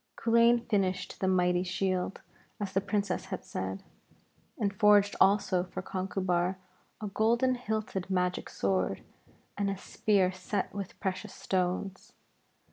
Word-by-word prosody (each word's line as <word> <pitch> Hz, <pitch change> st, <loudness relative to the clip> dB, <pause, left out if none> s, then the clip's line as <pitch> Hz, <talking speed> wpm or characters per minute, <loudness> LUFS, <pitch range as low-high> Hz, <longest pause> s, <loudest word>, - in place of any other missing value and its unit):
Culain 235 Hz, +1 st, +4 dB
finished 185 Hz, -3 st, 0 dB
the 190 Hz, -, 0 dB
mighty 180 Hz, -1 st, +3 dB
shield 185 Hz, +1 st, -1 dB, 0.4 s
as 200 Hz, -2 st, -4 dB
the 195 Hz, -, +2 dB
Princess 200 Hz, -1 st, -1 dB
had -, -, -6 dB
said, 95 Hz, +1 st, -4 dB, 0.7 s
and 200 Hz, -2 st, 0 dB
forged 205 Hz, 0 st, +5 dB
also 190 Hz, -2 st, +4 dB
for 185 Hz, -, -6 dB
Conchubar 185 Hz, -1 st, -1 dB, 0.4 s
a 215 Hz, -, -5 dB
golden 235 Hz, +5 st, +2 dB
hilted 215 Hz, -6 st, -3 dB
magic 180 Hz, -1 st, 0 dB
sword, 95 Hz, 0 st, -1 dB, 0.6 s
and 200 Hz, -1 st, +1 dB
a 195 Hz, -, -2 dB
spear 195 Hz, -1 st, +1 dB
set 185 Hz, +2 st, -3 dB
with 200 Hz, -2 st, -6 dB
precious 190 Hz, +1 st, -3 dB
stones. 185 Hz, +1 st, -2 dB
190 Hz, 125 wpm, -30 LUFS, 185-205 Hz, 0.7 s, forged